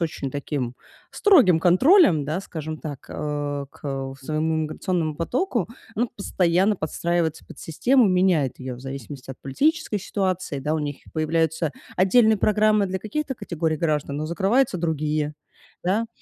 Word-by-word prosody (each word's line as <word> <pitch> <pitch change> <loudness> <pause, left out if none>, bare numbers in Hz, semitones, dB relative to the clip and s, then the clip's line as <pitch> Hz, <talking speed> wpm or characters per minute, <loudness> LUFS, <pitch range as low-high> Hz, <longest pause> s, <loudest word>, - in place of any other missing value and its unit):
очень 155 -5 -3
таким 135 -3 -3 0.4
строгим 255 - +5
контролем, 185 - +5
да, 155 +6 -2
скажем 155 -4 -6
так, 145 -4 -7
э, 145 -1 -3
к, - - -20
э, 135 -1 -3
своему 155 +2 0
миграционному 160 +1 -1
потоку, 240 - -1 0.3
она 240 +3 +1
постоянно 190 +1 +2
подстраивается 170 0 -1
под - - -13
систему, 240 - +2
меняет 180 -8 +2
её 130 -1 -6
в - - -13
зависимости 135 0 -8
от 130 - -9
политической 250 - 0
ситуации, 185 -6 -2
да. 150 +3 -1
У - - 0
них 145 -2 -3 0.2
появляются 160 0 0 0.3
отдельные 215 +3 +4
программы 215 0 +3
для 190 0 -3
каких-то 270 +7 -3
категорий 170 -7 -2
граждан, 150 -3 -1
но 150 - -2
закрываются 200 +6 +1
другие, 155 -2 -1 0.5
да? 210 +6 +1
165 Hz, 145 wpm, -24 LUFS, 150-200 Hz, 0.5 s, строгим